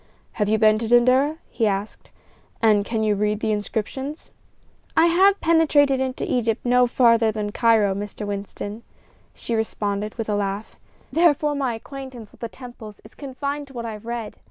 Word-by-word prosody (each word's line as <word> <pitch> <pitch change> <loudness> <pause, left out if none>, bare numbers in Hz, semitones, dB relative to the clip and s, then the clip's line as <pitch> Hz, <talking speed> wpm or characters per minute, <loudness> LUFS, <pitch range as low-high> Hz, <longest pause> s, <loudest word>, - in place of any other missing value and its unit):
"Have 210 -2 -1
you 220 - +3
been 215 0 +4
to 230 - -3
Dendera?" 255 +6 +4
he 225 - +1
asked; 200 +1 -4 0.5
"and 215 -2 +4
can 220 +1 -2
you 215 -1 +2
read 210 +1 0
the 220 - -1
inscriptions?" 225 +8 -4 0.7
"I 320 - +6
have 380 +4 +4
penetrated 295 -5 +3
into 260 -1 -2
Egypt 230 -1 -1
no 250 0 +4
farther 230 -2 +4
than 210 -1 -3
Cairo, 220 -3 +3
Mr. 205 +1 -6
Winston," 205 +1 -5 0.5
she 235 - -5
responded, 210 -2 -2
with 225 -2 -4
a 210 - 0
laugh; 200 +1 -3 0.4
"therefore 300 -2 +3
my 270 -5 -1
acquaintance 260 -2 -9
with - - -21
the 230 - -4
temples 240 -5 -11
is 215 - -16
confined 280 +1 -5
to 270 - -15
what 235 -2 -5
I 225 - -4
have 210 +2 -11
read. 235 -2 -5
230 Hz, 175 wpm, -23 LUFS, 210-265 Hz, 0.7 s, I